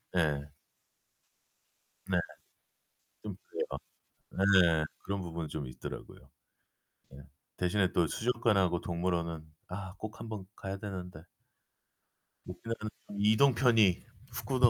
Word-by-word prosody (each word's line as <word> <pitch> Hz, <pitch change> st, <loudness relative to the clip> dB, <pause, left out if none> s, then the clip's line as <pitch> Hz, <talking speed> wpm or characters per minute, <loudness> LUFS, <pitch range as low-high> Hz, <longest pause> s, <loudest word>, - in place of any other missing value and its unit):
예. 75 Hz, -3 st, +1 dB, 1.6 s
네. -, -, +3 dB, 1.1 s
좀 -, -, -5 dB
그래요. -, -, -2 dB, 0.6 s
네. 90 Hz, -5 st, +5 dB
그런 100 Hz, 0 st, -3 dB
부분이 85 Hz, -3 st, -4 dB
좀 75 Hz, -2 st, -4 dB
있더라고요. 65 Hz, -, -8 dB, 1.3 s
대신에 90 Hz, +1 st, +2 dB
또 85 Hz, -2 st, +4 dB
수족관하고 105 Hz, -5 st, +2 dB
동물원은 85 Hz, -2 st, -1 dB, 0.2 s
아, 95 Hz, 0 st, -5 dB
꼭 110 Hz, -1 st, -6 dB
한번 110 Hz, -4 st, -5 dB
가야 95 Hz, 0 st, -4 dB
되는데. 90 Hz, -5 st, -6 dB, 1.2 s
오키나와는 115 Hz, -2 st, -4 dB, 0.3 s
이동편이 110 Hz, -3 st, +5 dB, 0.3 s
후쿠 135 Hz, +2 st, -2 dB
95 Hz, 210 characters per minute, -32 LUFS, 85-110 Hz, 1.6 s, 네